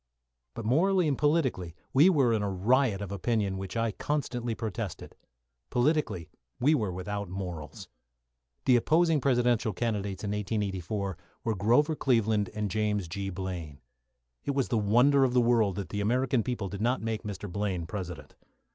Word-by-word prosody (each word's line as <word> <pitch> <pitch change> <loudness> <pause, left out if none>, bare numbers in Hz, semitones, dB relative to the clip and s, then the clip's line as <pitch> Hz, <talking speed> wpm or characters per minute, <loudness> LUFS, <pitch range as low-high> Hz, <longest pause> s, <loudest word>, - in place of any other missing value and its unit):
But, 115 - -5
morally 175 - +3
and 145 - +1
politically, 130 - 0 0.2
we 150 +8 +7
were 135 -10 +3
in 110 - +1
a 100 - -1
riot 105 +2 +2
of 100 - -6
opinion 100 0 0
against 95 - -4
which 95 +3 -5
I 115 -1 +1
constantly 125 -3 -2
protested. 110 -3 -5 0.5
Politically, 125 - 0 0.3
we 145 +5 +4
were 110 -10 0
without 100 +2 -4
morals. 90 -5 -6 0.8
The 125 -2 +6
opposing 160 +4 +3
Presidential 120 -4 +2
candidates 100 -3 -2
in 100 - -2
1884 100 -2 -2 0.3
were 115 -2 0
Grover 120 - +3
Cleveland 110 -7 +1
and 105 -2 -2
James 105 -2 0
G. 95 +4 -4
Blaine. 90 -6 -5 0.6
It 140 - -2
was 135 -2 0
the 115 - +1
wonder 125 +7 +4
of 125 -1 +1
the - - +6
world 115 -5 +3
that 100 -2 -5
the 100 - -2
American 125 +3 +2
people 110 -4 -3
did 100 +1 -6
not 120 +1 +1
make 110 -1 -2
Mr. 105 -2 -6
Blaine 95 -2 -2
President. 90 -3 -6
110 Hz, 165 wpm, -29 LUFS, 95-125 Hz, 0.8 s, we